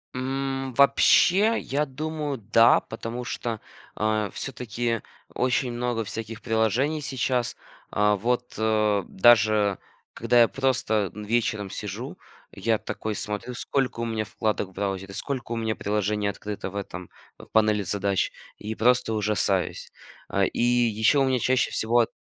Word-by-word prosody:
М, 135 0 -2
вообще, 190 - +5
я 145 +3 -1
думаю, 150 0 -4
да, 115 +2 +5
потому 115 +2 -6
что, 115 -3 -4 0.4
а, 110 -1 0
все-таки 120 -3 -3 0.3
очень 125 0 0
много 120 -1 -1
всяких 115 +2 -6
приложений 120 +7 +1
сейчас, 130 -3 -1 0.4
а, 105 0 +3
вот, 125 +4 -1
а, 110 -2 +2
даже 105 -2 +4 0.4
когда 120 -1 +3
я 115 - +6
просто 115 -7 0
вечером 105 -1 -1
сижу, - - -6 0.3
я 115 -1 0
такой 110 - -4
смотрю 105 +4 -4
сколько 125 0 -2
у 115 - -1
меня 110 -1 -1
вкладок 105 -2 -2
в - - -18
браузере, 95 0 -3
сколько 130 +3 -4
у 115 - -1
меня 110 -1 -1
приложений 105 0 -1
открыто, 100 0 -5
в - - -13
этом, 90 -3 -6 0.3
в - - -12
панели 105 -2 +2
задач, 100 +1 0 0.3
и 110 +1 -5
просто 120 0 +2
ужасаюсь. 105 -3 0 0.4
А, 100 0 +2
и - - -2
еще 120 +1 +3
у 135 - +4
меня 130 -1 +1
чаще 130 +2 +2
всего 115 +2 +2
ат 115 - +3
115 Hz, 145 wpm, -25 LUFS, 105-125 Hz, 0.4 s, я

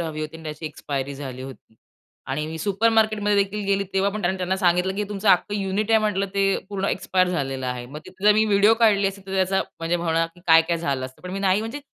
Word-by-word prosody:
हवी 160 -2 -4
होती 155 +1 -5
आणि 165 - -13
त्याची 155 +1 -6
एक्सपायरी 140 -2 -4
झाली 130 -2 -7
होती 130 -4 -11 0.6
आणि 150 +3 -2
मी 160 +1 -6
सुपरमार्केट 215 +3 +2
मध्ये 205 0 +2
देखील 205 +1 -5
गेली 200 0 +1
तेव्हा 195 +1 +2
पण 210 0 -5
त्यांना 185 +1 -1
सांगितलं 180 +1 +2
की 210 +1 -2
तुमचं 205 0 -2
अख्खं 195 +2 +3
युनिट 200 +2 -1
आहे 225 - +6
म्हटलं 205 -2 0
ते 200 - +2 0.3
पूर्ण 195 -1 -3
एक्सपायर 185 -1 +1
झालेलं 135 -6 -2
आहे. 125 -1 -4
मग 145 +4 -8
तिथे 190 +2 -11
जर 210 - +8
मी 215 +1 +4
व्हिडिओ 205 +1 +4
काढली 200 -3 +4
असेल, 195 0 -11
तर 190 - -7
त्याचा 190 0 +1 0.2
म्हणजे 165 +1 0
म्हणणं 165 -1 0 0.2
काय-काय 165 +1 +5
झालं 135 -5 -2
असतं. 130 - -17
पण 180 - -7
मी 195 - -4
नाही 195 +1 +2
म्हणजे 230 +6 -5
190 Hz, 230 wpm, -23 LUFS, 155-200 Hz, 0.6 s, जर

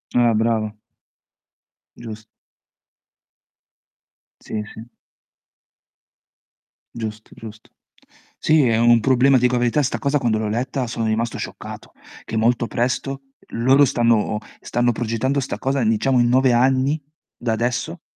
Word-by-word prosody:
Ah, 120 -2 +4
brava. 110 -1 0 1.2
Gius 110 -2 -9 2.2
Sì, 105 -1 -5
sì. 110 +2 -11 2.1
Giusto, 110 -2 -6
giusto. 110 -1 -12 0.7
Sì, 155 -2 +3
è 115 - +2
un 120 0 +5
problema. 130 +3 +3
Ti 125 - +2
dico 125 0 +3
la 125 - +2
verità, 120 +5 +1
'sta 130 - -2
cosa 140 +1 +1
quando 115 -4 +1
l'ho 110 -1 -2
letta 125 +3 -2
sono 115 0 -3
rimasto 110 +1 -1
scioccato: - - -8 0.3
che 110 - -5
molto 120 +1 +1
presto 135 +3 -2 0.3
loro 130 +5 +4
stanno 115 -4 +1 0.2
stanno 120 0 0
progettando 120 +4 -1
'sta 135 - -4
cosa, 135 0 -1
diciamo, 115 +4 +2
in 120 0 +3
9 130 0 +3
anni 130 +4 +2 0.3
da 120 -2 -3
adesso, 120 +2 -2
120 Hz, 125 wpm, -21 LUFS, 115-130 Hz, 2.2 s, un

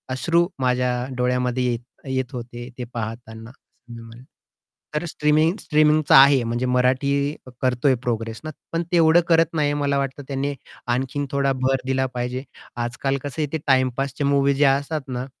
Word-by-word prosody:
अश्रू 170 +5 +2
माझ्या 125 -1 +1 0.3
डोळ्यामध्ये 125 0 0
येत 120 - -2 0.3
येत 130 -2 -2
होते 120 0 -7
ते 125 - -4
पाहताना 115 0 -6
असं 120 -2 -18
मी 115 - -9
म्हणेन. 115 +2 -13 0.7
तर 150 - 0
स्ट्रीमिंग 155 +1 +2
स्ट्रीमिंगचा 155 0 +3
आहे 135 -1 +7
म्हणजे 120 +2 -2
मराठी 125 +2 +2 0.5
करतोय 130 +1 +2
प्रोग्रेस 115 -2 -3
ना, 155 - -5 0.2
पण 165 +1 -1
तेवढं 170 -1 +5
करत 165 -1 +5
नाही 150 -2 +1
मला 140 -1 +1
वाटत 140 0 -3
त्याने 140 +1 -2 0.4
आणखीन 135 +3 -2
थोडा 140 -1 +1
भर 135 +1 +2
दिला 130 0 +1
पाहिजे. 125 +1 -3 0.3
आज-काल 120 +3 -2
कसं 145 +2 -4
आहे 150 - 0
ते - - +1
टाईमपासच्या 135 +1 +1
मूव्ही 140 0 +3
जे 145 +2 +3
असतात 140 +3 +1
ना, 125 -1 -4
130 Hz, 160 wpm, -22 LUFS, 125-145 Hz, 0.7 s, आहे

